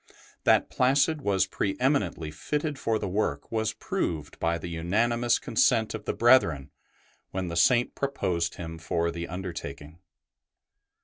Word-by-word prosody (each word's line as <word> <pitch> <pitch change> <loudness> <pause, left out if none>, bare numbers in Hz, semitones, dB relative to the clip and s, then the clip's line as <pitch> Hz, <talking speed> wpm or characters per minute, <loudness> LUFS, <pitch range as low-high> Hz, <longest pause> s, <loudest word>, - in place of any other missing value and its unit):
That - - +4
Placid 140 +4 +2
was 95 -5 +2
pre 95 0 -2
eminently 100 - 0
fitted 150 - -3
for 115 -4 0
the 100 - -3
work 90 -7 -2
was 110 -1 0
proved 75 -3 -3
by 85 0 +1
the 85 - -7
unanimous 115 +8 +1
consent 115 -1 +2
of - - -6
the - - -1
brethren 85 - +4 0.6
when 95 -2 -3
the 85 - -4
Saint 120 +8 +3
proposed 95 -12 -1
him 80 -1 -7
for 85 0 -1
the 85 +1 -5
undertaking. 85 -4 -7
95 Hz, 140 wpm, -27 LUFS, 85-120 Hz, 0.6 s, That